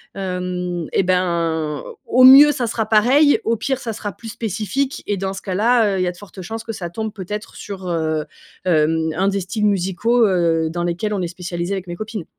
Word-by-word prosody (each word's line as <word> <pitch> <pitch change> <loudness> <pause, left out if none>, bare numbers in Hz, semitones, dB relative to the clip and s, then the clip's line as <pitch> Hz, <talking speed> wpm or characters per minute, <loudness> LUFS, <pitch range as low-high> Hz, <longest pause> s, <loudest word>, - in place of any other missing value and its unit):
hem, 180 -2 -3
eh - - +3
ben, 165 -5 0 0.2
au 255 +1 +4
mieux, 285 +3 +10
ça 250 -5 -2
sera 220 -1 -1
pareil, 260 +8 +4
au 230 +1 +2
pire 265 +4 -2
ça 225 -2 -4
sera 205 -1 -5
plus 225 - -11
spécifique 225 +6 -3
et 205 -1 -1
dans 190 +1 -3
ce 190 - -7
cas-là, 215 +1 +2
heu, - - -1
il - - +1
y - - 0
a - - 0
de 175 - -16
fortes 195 -1 -11
chances 220 +5 -6
que 225 - -6
ça 175 -4 -5
tombe 220 +3 -5
peut-être 210 +2 -6
sur, 190 -3 -7
heu, 160 -2 -1 0.4
hem, 160 -1 +2
1 190 +3 +1
des 200 0 -1
styles 210 +4 -4
musicaux, 205 +5 +2
heu, 165 -3 +1
dans 175 +1 -3
lesquels 175 +5 -2
on 195 - -1
est 175 - -1
spécialisées, 175 +1 -4
avec 190 -2 -4
mes 175 - -5
copines. 215 -3 -6
190 Hz, 220 wpm, -20 LUFS, 175-220 Hz, 0.4 s, mieux